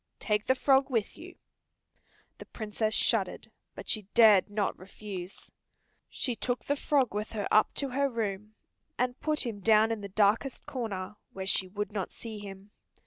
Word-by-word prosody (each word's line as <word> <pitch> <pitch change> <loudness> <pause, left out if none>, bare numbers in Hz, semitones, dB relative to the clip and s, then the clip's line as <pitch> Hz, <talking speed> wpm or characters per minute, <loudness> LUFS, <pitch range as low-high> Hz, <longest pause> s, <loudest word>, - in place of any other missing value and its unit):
"Take 210 -1 0
the 260 - +4
frog 270 0 +3
with 225 -5 -1
you." - - -11 1.0
The - - -10
Princess 215 0 -2
shuddered, - - +1 0.2
but - - -9
she 210 -4 -1
dared 215 -4 +7
not 205 -1 -1
refuse. 190 -1 -8 0.6
She 250 -3 -3
took 245 +2 -2
the 285 - +1
frog 275 -5 +1
with 210 +2 -3
her 205 -2 -2
up 215 - +5
to 275 - 0
her 275 +2 +1
room, 215 -3 -4 0.4
and 250 +1 -1
put 305 -3 0
him 225 -4 -4
down 220 +2 +4
in 225 -2 -2
the 200 - -6
darkest 215 +6 +1
corner, 205 -5 -4 0.2
where 190 0 -5
she 190 0 +2
would 205 +3 -4
not 200 -3 -3
see 220 -2 -8
him. 200 0 -10
215 Hz, 170 wpm, -30 LUFS, 200-245 Hz, 1.0 s, dared